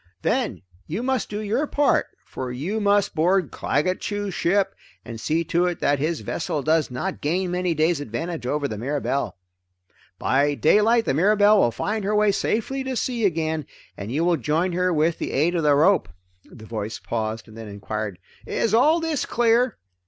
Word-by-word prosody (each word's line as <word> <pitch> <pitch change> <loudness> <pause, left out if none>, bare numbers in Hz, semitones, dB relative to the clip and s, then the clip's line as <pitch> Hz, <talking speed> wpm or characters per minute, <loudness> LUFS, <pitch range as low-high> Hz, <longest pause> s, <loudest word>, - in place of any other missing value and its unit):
Then - - 0 0.2
you 190 +10 -3
must 260 0 -1
do 210 0 -4
your 230 +8 0
part, 290 0 +2 0.2
for 130 -1 -6
you 165 - -3
must 205 0 +2
board 175 +1 +2
Claggett 185 +7 0
Chew's 205 -2 -3
ship 195 +3 +1 0.3
and 115 -1 -7
see 160 +2 0
to 170 +2 +1
it 175 - -3
that 145 -1 +1
his 155 +2 -1
vessel 155 -6 -3
does 155 0 +2
not 155 +10 -4
gain 175 +4 0
many 180 -1 0
days' 155 0 +1
advantage 150 +3 -4
over 145 +1 0
the 110 -5 -6
Mirabelle. 140 +2 -2 0.8
By 145 +2 +2
daylight 220 +9 +4
the - - +1
Mirabelle 205 +6 +4
will 120 - +4
find 210 - -3
her 210 +2 0
way 210 -1 +4
safely 230 +7 -1
to 260 -1 -2
sea 235 -2 -1
again, 160 -4 -1 0.3
and 100 +3 -6
you 155 +6 0
will 175 -1 +3
rejoin 155 +8 0
her 180 +1 +1
with 160 0 +1
the - - -3
aid 160 +6 +2
of 170 - 0
the 150 -2 +4
rope." 160 - +3 0.4
The 110 -3 -13
voice 110 0 -4
paused 110 0 -4
and 110 - -14
then 115 -1 -8
enquired, 105 -1 -5 0.3
"Is 220 - 0
all 305 +9 +5
this 320 -4 -1
clear?" 240 0 +2
170 Hz, 185 wpm, -23 LUFS, 140-205 Hz, 0.8 s, all